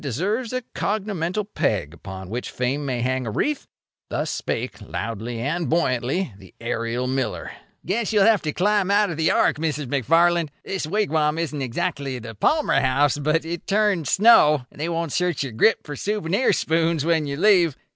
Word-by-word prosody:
Menefee 140 - -3
deserves 210 - -1
a 255 0 -2
cognomenal 200 -2 -2
peg 85 -8 0
upon 95 +2 -9
which 120 +2 -4
Fame 135 +3 -2
may 125 -2 -1
hang 130 0 -1
a - - -1
wreath. 290 - -1 0.4
Thus - - -2
spake, - - -4
loudly 115 +2 -5
and 150 +7 -2
buoyantly, 140 - 0
the 95 -2 -16
aerial 115 +1 -2
miller: 130 0 -2 0.3
"Guess 210 +5 -1
you'll 205 -3 +4
have 220 -3 +4
to 155 - -2
climb 200 +3 +1
out 205 -1 +3
of 160 - -5
the 160 0 +2
ark, - - +3
Mrs. 150 -2 -2
McFarland. 165 +6 +2 0.2
This 190 -5 -3
wigwam 160 -5 +1
isn't 155 -3 -3
exactly 140 0 -2
the 115 -1 -8
Palmer 300 - +2
House, 140 +2 +2
but 155 +2 +1
it 170 +1 -5
turns 200 -6 +1
snow, 150 - +5
and - - -10
they 165 - -1
won't 165 -2 -2
search 180 -2 0
your 135 - -5
grip 170 - +3
for 145 - -6
souvenir 205 - 0
spoons 165 -1 +1
when 160 -3 +1
you 140 0 -3
leave. 175 -5 +4
160 Hz, 180 wpm, -23 LUFS, 130-190 Hz, 0.4 s, snow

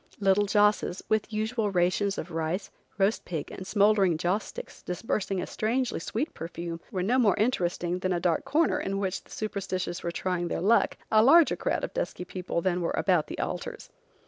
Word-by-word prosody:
Little 200 0 +3
josses, 205 -2 +2
with 215 0 +1
usual 220 0 -1
rations 195 +2 +1
of 175 - -5
rice, 165 +4 -2 0.3
roast 200 +2 +2
pig 160 -5 -5
and 190 - -8
smouldering 200 -5 +3
joss 180 +5 0
sticks - - -9
disbursing 195 +1 -2
a 180 - -2
strangely 240 +3 -1
sweet 235 - -3
perfume, 170 0 -6
were 190 -6 -2
no 245 +7 +2
more 215 -6 +4
interesting 180 -6 0
than 185 0 -1
a 175 - +1
dark 170 -2 +1
corner 320 +2 +2
in 195 0 -2
which 190 -1 -2
the - - -24
superstitious 190 -4 -3
were 170 - -2
trying 175 0 -2
their - - -2
luck, 215 +6 +3
a 215 - +6
larger 320 +6 +6
crowd - - -1
of - - -4
dusky 480 - -3
people 180 -2 -3
than 180 0 0
were 170 - -1
about 180 -5 +2
the - - -6
altars. - - -5
195 Hz, 190 wpm, -28 LUFS, 175-215 Hz, 0.3 s, a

